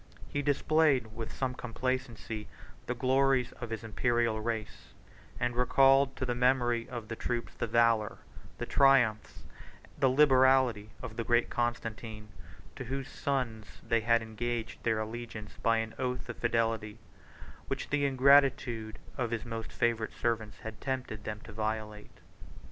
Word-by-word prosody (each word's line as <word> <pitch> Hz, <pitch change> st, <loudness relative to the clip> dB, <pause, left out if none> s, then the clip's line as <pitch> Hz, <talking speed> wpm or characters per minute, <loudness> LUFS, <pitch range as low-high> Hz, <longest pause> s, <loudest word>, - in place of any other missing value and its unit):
He 145 Hz, -, -1 dB
displayed, 145 Hz, -5 st, +2 dB
with 115 Hz, -1 st, -5 dB
some 130 Hz, -1 st, -2 dB
complacency, 125 Hz, -3 st, -4 dB, 0.4 s
the 125 Hz, -, -1 dB
glories 130 Hz, 0 st, +2 dB
of 120 Hz, -, -4 dB
his 115 Hz, -1 st, -5 dB
Imperial 115 Hz, 0 st, 0 dB
race; 110 Hz, -1 st, -5 dB, 0.4 s
and 120 Hz, 0 st, 0 dB
recalled 135 Hz, +2 st, +4 dB
to 130 Hz, -, -3 dB
the 125 Hz, -, 0 dB
memory 120 Hz, -1 st, +2 dB
of 120 Hz, -4 st, -6 dB
the 115 Hz, -, -4 dB
troops 120 Hz, +1 st, -3 dB
the 120 Hz, -, -3 dB
valor, 115 Hz, -1 st, +2 dB, 0.4 s
the -, -, -3 dB
triumphs, 120 Hz, -6 st, +3 dB, 0.6 s
the 135 Hz, -, +4 dB
liberality 130 Hz, -5 st, +4 dB
of 110 Hz, -, -7 dB
the 115 Hz, -, -1 dB
great 120 Hz, +1 st, +2 dB
Constantine, 110 Hz, -2 st, -3 dB, 0.5 s
to -, -, -6 dB
whose 135 Hz, +2 st, -4 dB
sons 120 Hz, -6 st, -3 dB
they 115 Hz, -1 st, +2 dB
had 115 Hz, +1 st, +3 dB
engaged 115 Hz, +1 st, -4 dB
their 110 Hz, -2 st, +1 dB
allegiance 110 Hz, -1 st, -6 dB
by 115 Hz, 0 st, +3 dB
an 110 Hz, 0 st, -2 dB
oath 125 Hz, -1 st, -2 dB
of 120 Hz, -, -5 dB
fidelity, 115 Hz, -2 st, 0 dB, 0.7 s
which -, -, -4 dB
the 145 Hz, -1 st, +1 dB
ingratitude 130 Hz, -5 st, +3 dB, 0.2 s
of 125 Hz, -2 st, 0 dB
his 115 Hz, 0 st, -3 dB
most 115 Hz, -1 st, -5 dB
favored 115 Hz, -2 st, 0 dB
servants 110 Hz, -2 st, -2 dB
had 110 Hz, -1 st, -8 dB
tempted 130 Hz, -5 st, -4 dB
them 105 Hz, 0 st, -5 dB
to 110 Hz, -, -10 dB
violate. 110 Hz, -1 st, -4 dB
120 Hz, 145 wpm, -31 LUFS, 110-130 Hz, 0.7 s, recalled